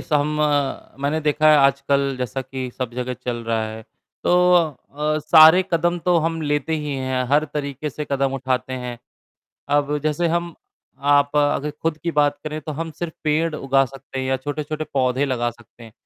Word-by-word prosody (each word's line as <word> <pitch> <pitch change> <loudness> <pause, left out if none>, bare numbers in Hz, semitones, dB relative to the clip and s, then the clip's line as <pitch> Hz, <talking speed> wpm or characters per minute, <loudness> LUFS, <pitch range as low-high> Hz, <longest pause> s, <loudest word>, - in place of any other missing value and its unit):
सम 145 -1 +1 0.8
मैंने 150 +3 0
देखा 155 +1 +3
है 155 - +7
आजकल 140 0 +2
जैसा 125 +1 -3
कि 130 -1 -6
सब 125 -2 -3
जगह 125 0 -3
चल 125 -1 -4
रहा 115 -1 0
है, 110 +1 -8 0.4
तो 180 0 +4
अ, 155 -2 0
सारे 160 +3 +7
कदम 175 +1 +1
तो 180 -1 +3
हम 165 0 -1
लेते 150 +2 0
ही 150 -2 -4
हैं, 130 -1 -1
हर 150 +1 +4
तरीके 145 0 -3
से 150 +2 -5
कदम 135 -1 +1
उठाते 130 -1 -2
हैं। 125 -2 -5 0.8
अब 145 0 +1
जैसे 155 +3 0
हम 170 0 -1 0.6
आप 145 +1 +3
अगर 145 0 +1
खुद 165 -1 0
की 170 - -2
बात 145 -1 +2
करें 155 0 -4
तो 155 +1 -6
हम 165 +2 -4
सिर्फ़ 170 -2 -4
पेड़ 155 +1 +1
उगा 135 -1 +2
सकते 135 0 -9
हैं 130 - -2
या 130 0 +1
छोटे-छोटे 150 +3 -4
पौधे 130 0 +1
लगा 120 -3 -1
सकते 120 0 -19
हैं, 110 - -14
145 Hz, 185 wpm, -22 LUFS, 130-155 Hz, 0.8 s, है